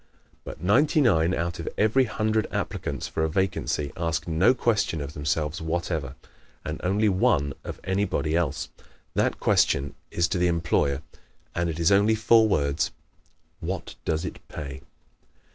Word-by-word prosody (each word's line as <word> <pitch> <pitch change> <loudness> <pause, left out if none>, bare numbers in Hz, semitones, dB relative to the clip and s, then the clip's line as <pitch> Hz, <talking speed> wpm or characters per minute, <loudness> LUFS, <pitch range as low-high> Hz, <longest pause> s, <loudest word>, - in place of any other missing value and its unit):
But - - -8
ninety 145 - +3
nine 90 - +4
out 85 0 -2
of 85 - -3
every 115 +5 +4
hundred 110 -1 0
applicants - - -3
for 80 - -2
a 80 - +1
vacancy 90 -5 -1
ask 80 0 -2
no 90 +10 +4
question 105 -9 +1
of 70 0 -5
themselves 75 +2 -1
whatever, 80 -4 -2 0.5
and - - -4
only 100 +4 +2
one 80 -7 +2
of - - -7
anybody 95 -5 0
else. 85 -5 -1 0.4
That - - +1
question 70 +1 +2 0.2
is 85 0 +1
to 90 - -1
the 90 - +3
employer 85 -5 +1 0.5
and 85 0 0
it 80 - -3
is 85 +3 +3
only 100 +3 +5
four 110 0 +5
words: 70 -6 +1 0.7
"_What - - -4
does 80 +2 -1
it - - -6
pay? 70 -3 -7
85 Hz, 150 wpm, -26 LUFS, 75-100 Hz, 0.7 s, only